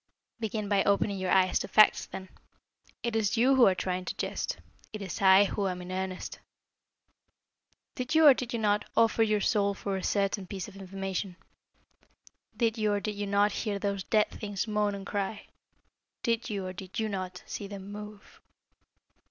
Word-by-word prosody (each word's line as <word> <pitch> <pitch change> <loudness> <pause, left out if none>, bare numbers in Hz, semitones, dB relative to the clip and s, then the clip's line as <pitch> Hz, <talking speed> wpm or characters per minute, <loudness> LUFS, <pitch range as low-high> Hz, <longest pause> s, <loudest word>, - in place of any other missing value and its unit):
"Begin 215 -2 -3
by 200 -1 +2
opening 200 0 +1
your 185 -1 -2
eyes 185 0 +4
to - - -4
facts, 215 - +5
then. 190 -1 -8 0.7
It 235 -2 -1
is 220 0 +1
you 255 +4 +5
who 255 -2 +7
are 190 - +3
trying 185 0 -2
to - - -4
jest. - - -3 0.3
It 215 - -6
is 195 -1 -6
I 190 +1 +7
who 200 0 -1
am 180 -1 -3
in 180 0 -8
earnest. 185 0 -4 1.5
Did 255 +5 -3
you, 320 0 +6
or 285 - +10
did 250 -2 -5
you 235 - -1
not, 210 -2 +1
offer 225 0 +4
your 215 -2 +2
soul 200 0 +1
for 195 0 -3
a 190 - -5
certain 195 -1 0
piece 190 -1 -5
of 205 - -13
information? 195 -1 -4 1.2
Did 230 -1 +1
you, 210 -1 +2
or 205 - +1
did 210 +1 -3
you 205 0 -4
not, 200 +1 +3
hear 210 -2 -2
those 200 -1 -2
dead 215 +1 +2
things 205 0 -4
moan 210 -1 0
and 195 -1 -8
cry? 200 +1 -3 0.8
Did 230 0 0
you, 200 -3 -3
or 185 - -5
did 185 +2 -9
you 220 - 0
not, 185 -3 -5
see 205 - -6
them 200 0 -8
move?" 210 0 -10
200 Hz, 185 wpm, -29 LUFS, 190-215 Hz, 1.5 s, or